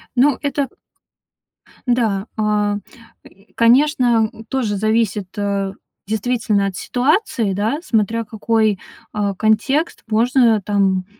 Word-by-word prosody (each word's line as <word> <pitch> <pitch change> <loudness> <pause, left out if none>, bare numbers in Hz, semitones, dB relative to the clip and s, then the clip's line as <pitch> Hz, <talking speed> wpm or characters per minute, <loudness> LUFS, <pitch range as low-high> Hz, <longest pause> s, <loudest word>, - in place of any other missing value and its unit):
Ну, 260 +2 +3
это 285 -1 -1 1.2
Да, 220 -5 +1
а, 210 -1 +1
м, 205 - -4 0.7
конечно, 240 -2 +4
м, 225 - -12
тоже 240 -6 -1
зависит, 215 -1 0
а, 200 -1 -1 0.3
действительно, 220 -2 0
от 195 - -5
ситуации, 250 - 0
да. 215 +9 -1
Смотря 230 - 0
какой, 220 -1 0 0.3
а, 205 -1 -1
контекст. 245 - +1
Можно 230 0 +3
там, 190 -2 +1
220 Hz, 105 wpm, -19 LUFS, 205-245 Hz, 1.2 s, конечно